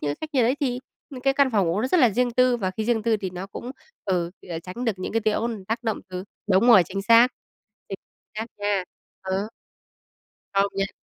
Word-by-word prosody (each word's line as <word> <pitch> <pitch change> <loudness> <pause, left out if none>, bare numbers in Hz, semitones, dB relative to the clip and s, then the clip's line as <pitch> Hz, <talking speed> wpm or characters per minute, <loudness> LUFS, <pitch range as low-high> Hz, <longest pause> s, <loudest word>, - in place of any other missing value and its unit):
những 145 - -2
cái 145 - -3
cách 315 - -5
như 260 -3 +3
đấy 250 +5 +2
thì 250 -3 0 0.3
những 260 -2 -8
cái 270 +1 +2
căn 280 -2 +3
phòng 200 -6 +2
ngủ 175 +6 0
nó 255 - 0
rất 360 - +3
là 245 -5 +6
riêng 245 +4 +1
tư 250 0 +3
và 190 -5 -2
khi 215 +3 -4
riêng 230 -2 +1
tư 225 -1 +2
thì 190 -3 -4
nó 180 +2 -6
cũng, 240 +5 -7 0.3
ừ, 175 -3 0 0.2
ờ, 165 - -3
tránh 185 +9 -7
được 225 - +2
những 185 - -4
cái 225 - +1
tiếng 215 -1 +1
ồn 225 -4 -3
tác 225 +4 -3
động 220 -2 -1
từ 185 0 -6 0.3
đúng 190 +5 +4
rồi, 220 -6 +9
chính 195 +3 -4
xác, 230 +3 +7 0.6
chính 195 - -4 0.4
xác 220 - -3
nha. 205 -2 0 0.4
Ừ. 190 +2 -2 1.0
Công 195 0 +3
nhận. 195 0 0
215 Hz, 240 wpm, -24 LUFS, 190-245 Hz, 1.0 s, rồi